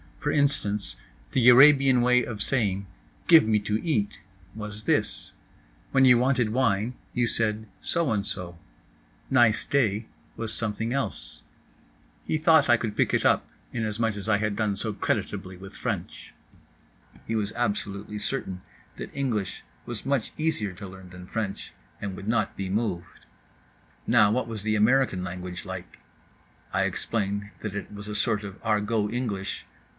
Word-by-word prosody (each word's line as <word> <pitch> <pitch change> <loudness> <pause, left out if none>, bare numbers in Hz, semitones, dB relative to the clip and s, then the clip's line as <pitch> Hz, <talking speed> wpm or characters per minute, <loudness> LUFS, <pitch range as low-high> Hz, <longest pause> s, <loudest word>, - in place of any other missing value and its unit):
For 150 - -1
instance—the 105 - +1
Arabian 135 0 +7
way 125 0 +4
of 105 -3 -3
saying 100 -7 0 0.4
"Give 165 -2 +8
me 110 -1 +4
to 105 +1 -1
eat" 110 -12 0 0.3
was 105 0 -6
this; - - 0 0.6
when 135 -1 +5
you 125 -2 +7
wanted 125 -2 +2
wine 115 -2 +1 0.2
you 120 - +2
said 110 -1 -1
so 170 -6 +1
and 100 -2 0
so; 90 -3 -3 0.7
"Nice 110 -4 +4
day" 110 -6 +1 0.3
was 110 -1 -2
something 115 +1 -1
else. 140 0 -2 0.8
He 155 - 0
thought 160 -3 +5
I 120 - +7
could 110 -2 -4
pick - - +2
it - - 0
up - - +3 0.3
inasmuch 110 -1 -1
as 105 +1 -4
I 105 - +4
had 105 0 -1
done 105 -2 0
so 110 +2 -3
creditably 95 -1 -2
with 95 +1 -11
French. - - -4 0.9
He 115 - -1
was 105 -2 -1
absolutely 105 -2 -2
certain 95 -7 -3 0.4
that - - -7
English 120 -9 -2 0.2
was 120 -2 -5
much 135 -4 0
easier 130 -11 -1
to 95 +3 -9
learn 95 0 -12
than 90 0 -11
French, 105 -2 -4 0.3
and 100 -2 -4
would 100 - -8
not 110 -2 0
be 95 -1 -4
moved. 95 -4 -3 0.8
Now 110 -3 +5
what 120 +1 0
was 110 -3 -5
the 110 0 +1
American 110 -3 +3
language 90 -1 -6
like? - - -8 0.7
I - - +2
explained 100 -2 -2
that 105 -2 -4
it 105 - -5
was 105 0 -8
a 105 - -5
sort 105 0 +1
of 100 -1 -8
Argot 105 -1 +1
English. 105 -6 -3
110 Hz, 155 wpm, -26 LUFS, 100-120 Hz, 0.9 s, Give